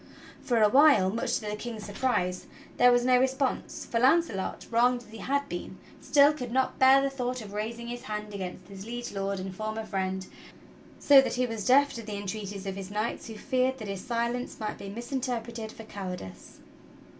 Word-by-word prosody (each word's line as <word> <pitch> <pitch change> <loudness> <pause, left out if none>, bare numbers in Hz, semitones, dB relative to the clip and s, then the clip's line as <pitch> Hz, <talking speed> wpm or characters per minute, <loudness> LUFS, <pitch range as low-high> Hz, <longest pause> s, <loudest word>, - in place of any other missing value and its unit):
For 240 -3 +1
a - - +7
while, 260 -6 +6
much 235 +3 -1
to - - -1
the 210 -1 -3
King's 220 -1 -6
surprise, 195 -5 -1 0.3
there 245 0 +7
was 245 0 +3
no 250 -1 +5
response; 265 +1 -1
for 230 - -1
Launcelot, 260 - +2
wronged 245 +1 +3
as 220 - -19
he 225 - -10
had 280 +6 -1
been, 175 +2 -6 0.2
still 285 +2 +5
could 250 -5 -6
not 260 +1 0
bear 265 +1 +7
the 275 - +1
thought 255 -1 -3
of 205 -3 -9
raising 230 +3 -4
his 240 0 -5
hand 210 0 -5
against 185 -2 -6
his 195 -1 -9
Liege 240 +1 -5
Lord 195 -1 -2
and 185 0 -6
former 215 +2 -4
friend, 190 -2 -2 0.7
so 280 -2 +7
that - - -2
he 250 0 +1
was 225 -4 -4
deaf 280 +3 +5
to 230 - -6
the 210 -2 -6
entreaties 200 -1 -5
of 195 -1 -3
his 195 -1 -6
knights 210 +3 -3
who 225 - -8
feared 260 +2 0
that 215 -4 -7
his 195 -1 -5
silence 235 0 -2
might 215 -1 -4
be 195 - -7
misinterpreted 235 -1 -4
for 225 - -11
cowardess. 185 - -8
230 Hz, 200 wpm, -28 LUFS, 200-255 Hz, 0.7 s, a